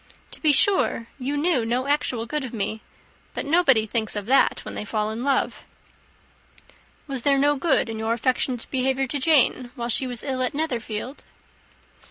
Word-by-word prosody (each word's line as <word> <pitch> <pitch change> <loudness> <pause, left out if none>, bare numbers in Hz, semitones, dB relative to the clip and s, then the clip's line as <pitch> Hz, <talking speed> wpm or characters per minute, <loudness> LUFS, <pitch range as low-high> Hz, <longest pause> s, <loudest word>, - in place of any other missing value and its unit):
To - - -6
be 310 - +4
sure 330 - +3
you 275 +3 -2
know 305 -5 +1
no 245 +3 -1
actual 270 -5 0
good 295 +4 -3
of 250 - -7
me 215 +1 -3 0.5
but - - -3
nobody 280 -8 +3
thinks 220 0 -1
of 205 -1 -4
that 265 +5 +2
when - - -7
they - - -5
fall 215 0 -2
in 225 +3 -5
love." 275 -1 0 1.4
"Was 270 -4 -4
there 275 +2 +3
no 290 +2 +3
good 305 0 +1
in 225 -1 -5
your 220 +1 0
affectionate 250 0 -1
behaviour 265 0 0
to 280 +2 -2
Jane, 265 -4 +3
while 240 -2 -4
she 260 +3 +3
was 245 -3 -4
ill 260 -2 -3
at 255 +2 -1
Netherfield?" 250 -4 -4
255 Hz, 180 wpm, -23 LUFS, 230-285 Hz, 1.4 s, be